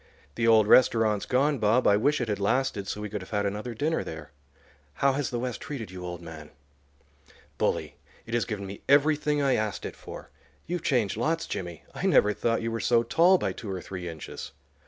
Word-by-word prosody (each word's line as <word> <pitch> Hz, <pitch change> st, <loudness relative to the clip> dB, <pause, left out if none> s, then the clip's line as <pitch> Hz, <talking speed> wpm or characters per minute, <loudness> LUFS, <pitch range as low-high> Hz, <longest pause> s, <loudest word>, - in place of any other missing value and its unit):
The 115 Hz, +10 st, 0 dB
old 110 Hz, -2 st, +6 dB
restaurant's 110 Hz, -4 st, +4 dB
gone, 140 Hz, +2 st, +2 dB
Bob; 110 Hz, +4 st, +3 dB
I 100 Hz, -, +6 dB
wish 145 Hz, +8 st, +2 dB
it 120 Hz, -, -1 dB
had 105 Hz, -2 st, -2 dB
lasted, 100 Hz, -1 st, 0 dB
so 105 Hz, -, -4 dB
we 105 Hz, -, -3 dB
could 105 Hz, -2 st, -4 dB
have 95 Hz, -, -11 dB
had 105 Hz, -1 st, -1 dB
another 105 Hz, +4 st, -3 dB
dinner 155 Hz, +8 st, 0 dB
there. 80 Hz, -3 st, -8 dB, 0.6 s
How 140 Hz, -1 st, +2 dB
has 140 Hz, 0 st, -1 dB
the 120 Hz, -, -3 dB
West 125 Hz, -2 st, -4 dB
treated 120 Hz, -10 st, -6 dB
you, 90 Hz, -1 st, -8 dB
old 90 Hz, -1 st, -6 dB
man?" 80 Hz, -2 st, -10 dB, 1.1 s
"Bully; -, -, -1 dB, 0.3 s
it 115 Hz, -, -8 dB
has 120 Hz, -, +1 dB
given 105 Hz, -3 st, -4 dB
me 100 Hz, +1 st, -8 dB
everything 150 Hz, +1 st, +3 dB
I 135 Hz, -2 st, +3 dB
asked 110 Hz, -3 st, -2 dB
it -, -, -6 dB
for. -, -, -10 dB, 0.3 s
You've 175 Hz, 0 st, -3 dB
changed 120 Hz, -, +1 dB
lots, 165 Hz, +7 st, 0 dB
Jimmy. 85 Hz, -3 st, -6 dB
I -, -, -2 dB
never 105 Hz, 0 st, +4 dB
thought 115 Hz, +3 st, 0 dB
you 115 Hz, -, -2 dB
were 115 Hz, -, -2 dB
so 120 Hz, 0 st, +3 dB
tall 170 Hz, +10 st, +4 dB
by -, -, -1 dB
two 110 Hz, -, -8 dB
or 95 Hz, -, -3 dB
three 90 Hz, -1 st, -6 dB
inches." 80 Hz, -2 st, -8 dB
115 Hz, 210 wpm, -27 LUFS, 100-135 Hz, 1.1 s, old